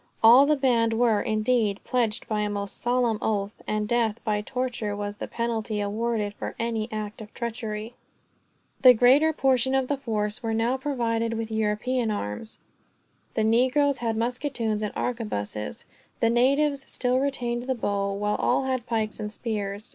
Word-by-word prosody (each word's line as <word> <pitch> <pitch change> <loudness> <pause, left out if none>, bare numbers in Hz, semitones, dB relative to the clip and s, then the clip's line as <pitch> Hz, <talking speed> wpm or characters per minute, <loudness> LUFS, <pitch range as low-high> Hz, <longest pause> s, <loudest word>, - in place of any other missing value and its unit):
All 245 +5 +8
the 300 - +4
band 235 -5 +2
were, 225 -2 +3
indeed, 215 -1 +1
pledged 235 -4 -1
by 215 -1 -1
a 210 - 0
most 200 -1 -4
solemn 240 -3 +1
oath; 205 -1 -2
and 210 0 -1
death, 230 -1 +1
by 210 -2 0
torture, 240 -3 -3
was 205 0 -4
the - - -5
penalty 230 -2 -2
awarded 210 0 -1
for - - -6
any 230 -1 -2
act 215 0 -5
of 215 0 -10
treachery. 225 -1 -4 0.9
The 255 -2 +9
greater 265 +7 +5
portion 265 -3 +2
of 265 -1 +1
the 285 - +1
force 215 -5 -2
were 225 -1 -1
now 230 +3 +1
provided 230 -4 -1
with 225 0 -4
European 220 +3 0
arms. 205 - -4 0.8
The 220 - +2
negroes 260 +5 +3
had 225 -2 -1
musketoons 235 -2 -1
or 210 - -2
arquebuses, 105 - -3 0.3
the 230 - +3
natives 275 +3 +2
still 250 0 +1
retained 245 -3 -2
the 260 - 0
bow, 200 -3 -1
while 210 +1 -1
all - - +2
had 260 -2 -2
pikes 220 -2 -1
and 210 -1 -4
spears. 210 -2 -4
230 Hz, 160 wpm, -26 LUFS, 210-250 Hz, 0.9 s, The